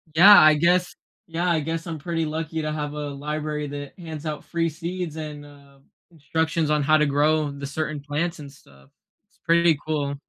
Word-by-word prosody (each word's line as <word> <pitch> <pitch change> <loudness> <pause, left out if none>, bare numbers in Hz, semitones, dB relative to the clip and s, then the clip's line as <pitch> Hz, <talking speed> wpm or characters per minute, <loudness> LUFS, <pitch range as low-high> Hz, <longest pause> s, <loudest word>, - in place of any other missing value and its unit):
Yeah, 200 +5 +9
I 155 0 +7
guess 175 +3 +2 0.3
yeah, 170 +2 -1
I 170 -2 +2
guess 165 +3 -4
I'm 165 -1 -4
pretty 165 +1 -2
lucky 160 +1 -3
to 155 0 -3
have 150 -1 -4
a 150 -1 -4
library 150 +1 -4
that 145 0 -8
hands 160 -3 -8
out 150 -1 -4
free 170 -1 -1
seeds 170 +1 -5
and, 150 -2 -7
uh, 140 -1 -18 0.3
instructions 160 +1 -1
on 150 -1 +2
how 155 +2 +4
to 150 - +3
grow 150 +1 +2
the 140 0 -7
certain 155 +1 -4
plants 155 +4 -3
and 145 -2 -9
stuff. 70 - -21 0.4
It's - - -35
pretty 170 -1 +4
cool. 145 -2 -1
155 Hz, 195 wpm, -24 LUFS, 145-165 Hz, 0.4 s, Yeah